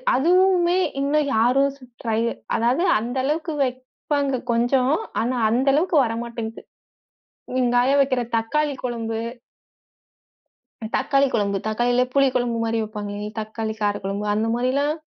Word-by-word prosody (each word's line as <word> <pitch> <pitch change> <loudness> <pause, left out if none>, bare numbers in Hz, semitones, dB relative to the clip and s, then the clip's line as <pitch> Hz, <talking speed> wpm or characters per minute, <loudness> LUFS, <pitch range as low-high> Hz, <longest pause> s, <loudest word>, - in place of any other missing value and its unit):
அதுவுமே 360 +3 +3 0.2
இன்னு 285 +2 +2 0.2
யாரு 250 +5 +3
சு 270 - -18 0.2
ட்ரை 225 -1 0 0.4
அதாது 245 +8 +1 0.2
அந்த 240 +3 -5
அளவுக்கு 310 +3 -1
வெப்பாங்க 260 +2 -2
கொஞ்சம். 250 +4 +2 0.3
ஆனா 250 +2 -1
அந்த 255 +5 +1
அளவுக்கு 330 +2 +2
வர 225 - -2
மாட்டேங்குது. 230 -1 -6 1.0
எங்காயா 245 +2 +3
வெக்கிற 260 -2 +1 0.2
தக்காளி 290 +6 0
குழம்பு. 230 -2 -3 1.8
தக்காளி 275 +1 +2
கொழம்பு 200 -2 +1
தக்காளிலே 245 +3 +2
புளி 275 -1 +5
குழம்பு 240 -2 0
மாரி 230 0 0
வைப்பாங்லே, 210 -1 -5
தக்காளி 220 0 -4
காரகொழம்பு 205 0 -2
அந்த 220 +1 0
மாரிலாம், 275 +5 +1
245 Hz, 120 wpm, -22 LUFS, 225-275 Hz, 1.8 s, புளி